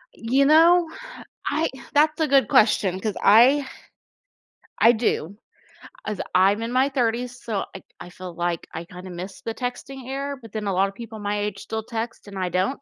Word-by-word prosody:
You 260 +5 +2
know, 330 +3 +5 0.6
I 325 +1 0 0.2
that's 305 +2 +3
a 315 - +2
good 270 -5 +4
question 200 -4 +3
'cause 210 0 -3
I 260 +7 +6 1.1
I 230 - +7
do. 205 -5 -1 0.7
As 210 -2 -4 0.2
I'm 195 +4 +4
in 230 +1 -3
my 260 +2 +3
30s, 245 -1 -1
so, 215 -4 -2
I 195 - -8 0.2
I 175 - -9
feel 180 0 -9
like 175 -1 -2
I - - -5
kinda 180 +1 -10
miss 180 +2 -8
the 225 - -4
texting 255 +1 -6
era, 275 +2 -4
but 225 -3 -13
then 210 -1 -4
a 195 - 0
lotta 195 +2 +2
people 225 +1 -9
my 205 0 -2
age 205 -1 -3
still 220 +2 -5
text, 230 0 -6
and 200 -1 -9
I 185 -1 -1
don't. 185 +11 -1
225 Hz, 185 wpm, -23 LUFS, 195-265 Hz, 1.1 s, I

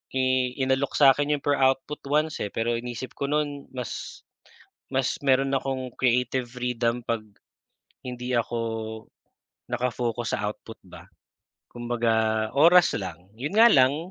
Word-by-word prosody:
i 130 -1 +1
inalok 130 +1 0
sa'kin 145 +1 +4
'yong 140 - -8
per 145 -1 +1
output 135 +2 +1
once, 150 +2 0
eh, 105 - -1
pero 115 +2 -1
iniisip 120 +1 -6
ko 140 - -3
no'n 145 -1 -2
mas, 125 -4 -6 0.6
mas 130 -1 -1
meron 135 0 +2
akong 130 -2 -2
creative 125 0 +1
freedom 120 -1 -2
'pag 115 0 -1 0.9
hindi 125 0 -4
ako, 120 0 0 1.1
naka-focus 120 -1 -2
sa 105 - -2
output 110 +1 -13
ba. 90 - -14 0.6
Kumbaga 115 -2 0
oras 175 +3 +7
lang. 90 -1 -8
Yun 145 +9 -4
nga 230 +2 +7
lang, 145 - +3
125 Hz, 130 wpm, -25 LUFS, 120-140 Hz, 1.1 s, oras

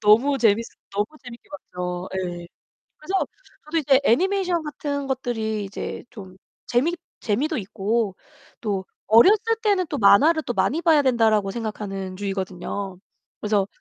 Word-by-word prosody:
너무 230 +7 +5
쟀밌었 225 0 +3 0.3
너무 205 +1 0 0.2
재밌게 240 -1 -11
봤죠. 180 -10 -5
예. 175 -2 -4 0.5
그래서 380 +5 -1 0.4
저도 310 +2 -2
이제 275 -3 +4
애니메이션 360 - +2
같은 285 -1 -4
것들이 225 -5 -2
이제 195 - -6
좀 190 -4 -11 0.3
재미 265 +8 +2 0.3
재미도 275 +10 0
있고 205 0 -1 0.5
또 195 -4 -2 0.2
'어렸을 240 - +7 0.2
때는 395 -4 +2
또 290 - -2
만화를 300 +10 +5
또 245 - -2
많이 230 - +1
봐야 320 -4 +5
된다.'라고 220 -6 +3
생각하는 195 -4 -5
주의거든요. 195 -1 -4 0.4
그래서 205 -2 +1
225 Hz, 310 characters per minute, -23 LUFS, 195-290 Hz, 0.5 s, 어렸을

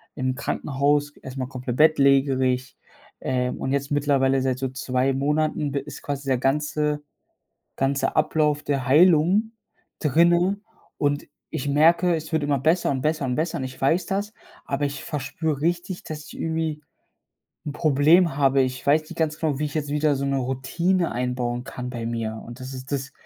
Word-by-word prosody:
im 130 -2 -1
Krankenhaus, 145 +2 0
erst 130 +1 -9
mal 130 - -2
komplett 125 -2 -5
bettlägerig, 135 -4 +3 0.4
äh, 125 -1 -1
und 130 - -4
jetzt 140 0 -1
mittlerweile 135 -2 +2
seit 130 -1 0
so 135 - -1
2 130 0 0
Monaten 150 +2 0
b 140 - -1
ist 145 +2 -9
quasi 140 -1 -5
der 130 -2 +2
ganze 150 +2 0 0.7
ganze 135 +1 0
Ablauf 150 -1 +2
der 140 -2 -1
Heilung 175 - +4 0.5
drinnen 175 +6 +3 0.3
und 145 0 0 0.3
ich 145 -3 -3
merke, 170 +4 +4
es 160 +1 -6
wird 160 -2 +1
immer 145 -1 +1
besser 160 +6 +2
und 135 -2 -2
besser 155 0 0
und 125 -1 -1
besser 160 +2 -1
und - - -3
ich 130 0 -7
weiß 165 +7 +2
das, 205 +2 -2 0.3
aber 140 +1 -1
ich 140 -1 -4
verspüre 150 0 -3
richtig, 175 +3 -1
dass 155 -1 -7
ich - - -11
irgendwie 160 -2 -2 0.8
'n 150 - -3
Problem 155 +2 +4
habe. 135 -1 +4
Ich 130 0 -2
weiß 150 +2 +4
nicht 165 +2 -12
ganz 155 -2 -1
genau, 155 -4 0
wie 150 - 0
ich 145 - -5
jetzt 150 -2 -2
wieder 150 0 +2
so 140 +1 -2
'ne 140 0 0
Routine 165 +8 0
einbauen 125 0 -2
kann 125 -1 -6
bei 120 -2 -5
mir 115 -1 -3
und 120 +1 -10
das 130 +1 -7
ist 130 +1 -9
das 140 -1 -3
145 Hz, 180 wpm, -24 LUFS, 130-155 Hz, 0.8 s, Heilung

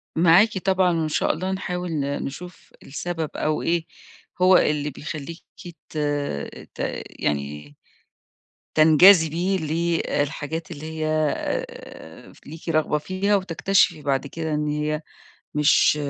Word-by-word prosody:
معاكِ 180 +6 +5
طبعًا، 185 -2 +2
وإن 155 -1 -1
شاء - - +1
الله 185 +4 -3
نحاول 180 -2 -3
ن 140 -2 -2
نشوف 175 +6 -9
السبب، 165 +2 -4
أو 155 0 -1
إيه 170 -1 0 0.6
هو 185 0 +7
اللي 150 -1 +1
بيخلّيكِ 155 +3 -7 0.2
ت 165 -2 -11 0.8
ت - - -19 0.4
يعني 75 0 -3 1.0
تنجذبي 165 +3 +6
للحاجات 160 -1 -2
اللي 155 -1 -8
هي 155 -1 -3 0.3
آآ 80 0 -7
ف - - -21
ليكِ 160 +2 -8
رغبة 155 -1 +1
فيها 190 +6 0
وتكتشفي 185 -2 +1
بعد 140 -1 -1
كده 160 +2 -4
إن 150 0 -1
هي 150 +1 -1 0.5
مش 150 0 +4
160 Hz, 120 wpm, -23 LUFS, 150-180 Hz, 1.0 s, هو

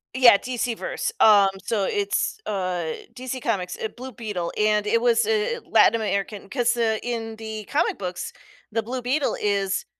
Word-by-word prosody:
Yeah. 245 -5 +8
DC 245 -1 -2
Verse. - - -3
Um, 205 -3 +7
so 205 -4 0
it's, 405 +1 0
uh, 180 -5 -2 0.2
DC 255 +1 -5
Comic's, 185 -7 -2
eh, 220 - -1
Blue 255 +3 -9
Beetle, 205 -6 -4
and 210 0 +2
it 230 +2 +2
was, 235 -1 +3
eh, 450 +2 0
Latin - - +5
American. 200 -2 -2
‘Cause, 245 -1 +1
uh, 225 -2 +1
in 225 -2 -4
the 220 -1 -6
comic - - 0
books, 180 -2 -5 0.4
the 225 +1 -1
Blue 250 +3 -4
Beetle 270 +4 0
is 200 -2 0
225 Hz, 170 wpm, -24 LUFS, 200-250 Hz, 0.4 s, Yeah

